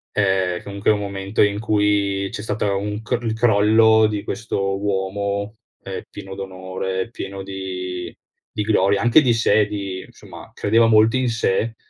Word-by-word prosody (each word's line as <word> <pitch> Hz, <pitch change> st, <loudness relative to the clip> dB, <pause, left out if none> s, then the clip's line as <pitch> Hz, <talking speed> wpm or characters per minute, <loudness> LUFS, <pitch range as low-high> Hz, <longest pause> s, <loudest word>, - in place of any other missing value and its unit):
Eh, 95 Hz, -3 st, +1 dB
comunque 100 Hz, 0 st, -2 dB
un 105 Hz, -1 st, +3 dB
momento 100 Hz, 0 st, -1 dB
in 100 Hz, 0 st, +1 dB
cui 105 Hz, -3 st, +1 dB
c'è -, -, -5 dB
stata 105 Hz, -1 st, -1 dB
un 105 Hz, +2 st, -3 dB
cr 120 Hz, +1 st, -2 dB
il 115 Hz, -1 st, -1 dB
crollo 110 Hz, 0 st, +4 dB
di 105 Hz, -1 st, -3 dB
questo 100 Hz, -3 st, -2 dB
uomo, 100 Hz, +1 st, -2 dB, 0.3 s
ehm, -, -, -5 dB
pieno 95 Hz, 0 st, -9 dB
d'onore, 95 Hz, 0 st, -4 dB
pieno 95 Hz, -4 st, -6 dB
di 90 Hz, -2 st, -6 dB, 0.4 s
di 105 Hz, -, -2 dB
gloria, 100 Hz, -2 st, +2 dB
anche 120 Hz, +6 st, +6 dB
di 125 Hz, -5 st, +3 dB
sé 110 Hz, -2 st, +3 dB
di 100 Hz, -3 st, -5 dB
insomma -, -, -13 dB
credeva 115 Hz, +2 st, +3 dB
molto 110 Hz, +1 st, +4 dB
in 130 Hz, -1 st, +1 dB
sé, 115 Hz, 0 st, 0 dB
100 Hz, 155 wpm, -21 LUFS, 95-110 Hz, 0.4 s, anche